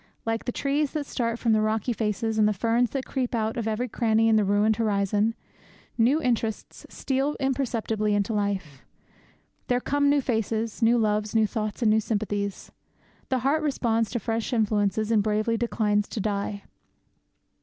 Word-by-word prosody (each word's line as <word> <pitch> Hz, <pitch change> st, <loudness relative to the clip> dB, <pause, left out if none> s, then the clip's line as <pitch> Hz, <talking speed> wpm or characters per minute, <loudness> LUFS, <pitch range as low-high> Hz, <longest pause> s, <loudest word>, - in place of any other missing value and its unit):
Like 225 Hz, 0 st, -2 dB
the 245 Hz, -, -1 dB
trees 280 Hz, +3 st, -1 dB
that 300 Hz, -2 st, -2 dB
start 230 Hz, -3 st, -2 dB
from 230 Hz, -2 st, +1 dB
the 215 Hz, -, +3 dB
rocky 220 Hz, +2 st, 0 dB
faces, 220 Hz, 0 st, -1 dB
and 210 Hz, -, +5 dB
the 210 Hz, -, +2 dB
ferns 230 Hz, +4 st, +1 dB
that 270 Hz, -2 st, -3 dB
creep 255 Hz, -3 st, -2 dB
out 220 Hz, -1 st, -1 dB
of 230 Hz, -2 st, -2 dB
every 220 Hz, +3 st, -1 dB
cranny 225 Hz, -2 st, +2 dB
in 225 Hz, -, +4 dB
the 215 Hz, -, +4 dB
ruined 205 Hz, +2 st, +2 dB
horizon, 210 Hz, 0 st, +1 dB, 0.6 s
new 250 Hz, +7 st, +3 dB
interests 235 Hz, -6 st, -2 dB
steal 275 Hz, +2 st, -1 dB
imperceptibly 230 Hz, -6 st, 0 dB
into 205 Hz, +2 st, 0 dB
life. 195 Hz, -9 st, -2 dB, 0.8 s
There 245 Hz, 0 st, +2 dB
come 285 Hz, +2 st, +1 dB
new 285 Hz, 0 st, +4 dB
faces, 225 Hz, -3 st, -2 dB
new 230 Hz, +1 st, +4 dB
loves, 215 Hz, -1 st, 0 dB
new 220 Hz, -1 st, +4 dB
thoughts, 215 Hz, +2 st, -3 dB
and 215 Hz, -, +4 dB
new 220 Hz, -, +4 dB
sympathies. 205 Hz, -2 st, -3 dB, 0.6 s
The 260 Hz, -, +1 dB
heart 300 Hz, +3 st, +2 dB
responds 230 Hz, -7 st, 0 dB
to 240 Hz, -, -2 dB
fresh 225 Hz, +3 st, -2 dB
influences 215 Hz, -1 st, +1 dB
and 220 Hz, -2 st, +4 dB
bravely 215 Hz, +2 st, 0 dB
declines 210 Hz, -3 st, 0 dB
to -, -, -5 dB
die. 200 Hz, 0 st, -2 dB
225 Hz, 170 wpm, -26 LUFS, 210-240 Hz, 0.8 s, and